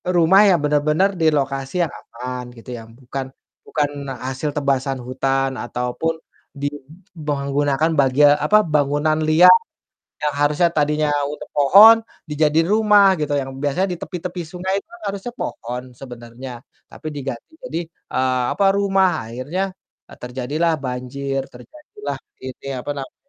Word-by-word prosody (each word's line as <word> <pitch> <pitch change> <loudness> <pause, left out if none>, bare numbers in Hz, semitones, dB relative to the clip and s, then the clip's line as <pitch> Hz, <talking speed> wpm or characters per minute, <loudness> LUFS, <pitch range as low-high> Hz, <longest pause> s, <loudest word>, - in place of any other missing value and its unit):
rumah 175 +4 +6
yang 175 - +4
bener-bener 150 +5 +2
di 160 - +3
lokasi 135 -2 -1
yang 160 - -3
aman, 125 +1 -7
gitu 115 +2 -13
ya, 115 - -9
bukan 130 +3 -7 0.4
bukan 145 -1 0 0.4
hasil 135 +3 -3
tebasan 135 -2 0
hutan 135 +1 0
ataupun 125 +7 -2 0.4
di 145 0 -2 0.6
menggunakan 145 +2 0
bagia 140 +2 +5 0.2
apa 215 - +5
bangunan 150 0 +1
liar, 175 +4 +8 0.7
yang 150 - +1
harusnya 150 +4 +3
tadinya 150 -1 +1 0.2
untuk 150 - -7
pohon 195 +11 +8 0.3
dijadiin 155 +2 +2
rumah 210 -3 +5
gitu, 150 -1 -1
yang 135 -1 -2
biasanya 145 +7 0
di 175 - -3
tepi-tepi 180 -1 -5
sungai 185 +3 -4
itu - - -22 0.2
harusnya 200 +4 -4
pohon 125 - -5 0.2
sebenarnya, 120 -1 -9 0.3
tapi - - -9
diganti 135 -4 -6
jadi, 170 -10 -3
eee, 130 -4 -1
apa 200 - +2
rumah, 195 -2 +3 0.2
akhirnya, 140 +11 -3 0.5
eee, - - -13
terjadilah 135 +7 -1
banjir, 130 +2 -3
terjadilah 305 - -9 0.3
ini, 130 +1 -8
apa 145 - -4
namanya, 135 -1 -7
145 Hz, 135 wpm, -20 LUFS, 130-165 Hz, 0.7 s, liar